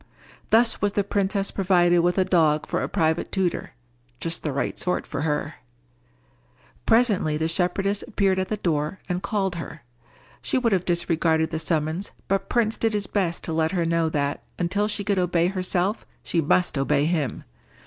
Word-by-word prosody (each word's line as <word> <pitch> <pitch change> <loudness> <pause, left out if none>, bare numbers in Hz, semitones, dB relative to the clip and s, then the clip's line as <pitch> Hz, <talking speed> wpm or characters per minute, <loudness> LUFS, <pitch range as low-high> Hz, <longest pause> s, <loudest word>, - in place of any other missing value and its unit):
Thus 230 +1 +3
was 205 -1 +1
the 205 - +1
princess 200 0 -1
provided 175 -2 +3
with 175 +2 +1
a 190 - +3
dog 160 -5 +2
for - - -2
a - - -2
private 160 0 0
tutor—just 125 -5 -4
the 150 - -2
right 140 - -2
sort 180 - -1
for - - -4
her. 150 -1 -2 1.3
Presently 215 -10 +3
the 160 +1 0
shepherdess 195 +4 0
appeared 195 -5 +1
at 190 - -1
the 215 - -2
door 160 -2 -1
and 180 0 -2
called 195 -4 -1
her. 165 -2 -8 0.6
She - - 0
would 240 -3 +1
have 180 -2 +1
disregarded 165 -2 +1
the 160 - -2
summons, 160 +3 -2
but 195 0 -1
Prince 225 -2 +1
did 225 -1 0
his 205 -1 0
best 180 -4 -1
to 160 - -3
let 160 +2 +1
her 175 -3 +1
know 165 -1 +1
that, 145 -2 -1 0.2
until 200 +4 0
she 210 -1 -2
could 200 -1 +1
obey 175 -1 +2
herself, 185 +1 -1 0.2
she 170 - 0
must 160 0 +1
obey 145 +1 +2
him. 155 -7 -1
175 Hz, 175 wpm, -24 LUFS, 160-195 Hz, 1.3 s, Thus